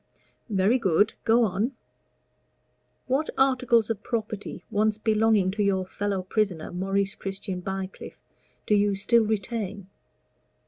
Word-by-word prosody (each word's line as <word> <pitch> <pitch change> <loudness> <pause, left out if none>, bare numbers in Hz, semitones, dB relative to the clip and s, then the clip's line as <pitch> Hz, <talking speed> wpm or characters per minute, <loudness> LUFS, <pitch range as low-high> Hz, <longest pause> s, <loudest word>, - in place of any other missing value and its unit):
"Very 205 +5 +2
good. 205 0 +2
Go 235 +2 +5
on." 215 +5 0 1.3
"What 270 +4 0
articles 250 -4 +3
of 210 -3 -4
property 215 -3 -4
once 215 0 +2
belonging 215 -3 +2
to 205 +1 -1
your 190 -2 +1
fellow 195 0 -2
prisoner, 190 -4 -1
Maurice 195 +2 -1
Christian 195 -1 -5
Bycliffe, 190 +1 -6 0.5
do - - +1
you 205 -1 +3
still 225 +4 +3
retain?" 205 -2 -3
205 Hz, 120 wpm, -26 LUFS, 195-225 Hz, 1.3 s, Go